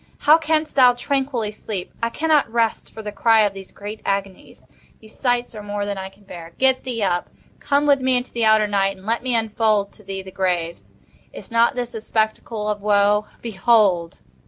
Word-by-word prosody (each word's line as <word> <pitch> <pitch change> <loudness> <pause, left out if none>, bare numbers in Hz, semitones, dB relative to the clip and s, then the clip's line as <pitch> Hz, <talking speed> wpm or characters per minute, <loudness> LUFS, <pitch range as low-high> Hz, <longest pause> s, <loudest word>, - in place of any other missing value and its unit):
How 310 +2 +6
canst 315 -1 -1
thou 250 -2 +6
tranquilly 260 -3 -2
sleep? 210 -3 -6
I 230 - 0
cannot 300 -2 +1
rest 230 -1 -1
for 220 - -9
the 210 - -5
cry 225 +2 +4
of 205 -2 +1
these 195 -1 -10
great 205 +2 -8
agonies. 195 -1 -4 0.3
These 220 0 -16
sights 245 -2 0
are 215 - -8
more 205 0 -4
than 200 -1 -4
I 190 0 -6
can 195 +1 -24
bear. 170 -4 -11
Get 265 -1 +3
thee 235 -4 -2
up! 175 -2 -1 0.3
Come 285 +1 +1
with 280 -2 +3
me 255 -1 +2
into 245 +1 -5
the 235 - -1
outer 220 -1 +5
Night, 195 -1 0
and 190 - -16
let 230 +2 0
me 250 -1 0
unfold 215 -2 +1
to 210 - -17
thee 195 -1 -5
the 190 - -11
graves. 175 -3 -2 0.5
Is - - -11
not 230 +1 +3
this 245 -1 -4
a 225 - -6
spectacle 220 0 -2
of 210 -1 -2
woe?—Behold!" 205 -2 +1
215 Hz, 200 wpm, -21 LUFS, 200-245 Hz, 0.5 s, How